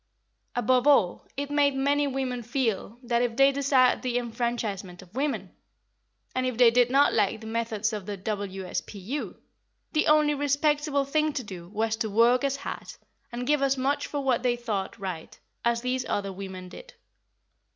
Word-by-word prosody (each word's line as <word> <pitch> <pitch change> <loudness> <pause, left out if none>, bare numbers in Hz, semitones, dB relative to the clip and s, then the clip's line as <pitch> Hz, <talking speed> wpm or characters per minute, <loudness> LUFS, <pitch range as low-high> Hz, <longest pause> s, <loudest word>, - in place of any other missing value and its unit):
Above 250 +2 +2
all, 215 -11 +3
it 285 0 -3
made 285 -1 +3
many 285 +2 +2
women 260 -2 -2
feel 235 -3 -2
that, 240 -1 +1
if 240 -2 -1
they 275 0 +6
desired 270 -2 +3
the 250 -1 -1
enfranchisement 225 -6 -3
of 185 +1 -20
women, 280 +3 -2 0.8
and 255 0 0
if 250 -3 -3
they 240 -2 +7
did 245 0 +4
not 275 +3 +4
like 205 +2 +1
the 220 - -11
methods 225 -1 -1
of 205 -2 -5
the 205 -1 -4
W.S.P.U., 200 +4 -4 0.6
the 310 - +2
only 300 -1 +5
respectable 290 0 +1
thing 305 +2 +1
to 265 - -3
do 180 -5 -9
was 220 +2 0
to 220 -1 -2
work 235 +5 +4
as 275 -1 +1
hard, 280 - -6 0.4
and 245 +1 -4
give 295 +1 +2
as 275 0 +2
much 270 +3 0
for 290 - -3
what 255 -3 +2
they 245 -1 +2
thought 215 -5 -3
right, 185 -6 -6 0.2
as 235 0 +1
these 250 +1 -1
other 200 -1 -1
women 190 -1 -7
did. - - -12
245 Hz, 170 wpm, -27 LUFS, 215-275 Hz, 0.8 s, they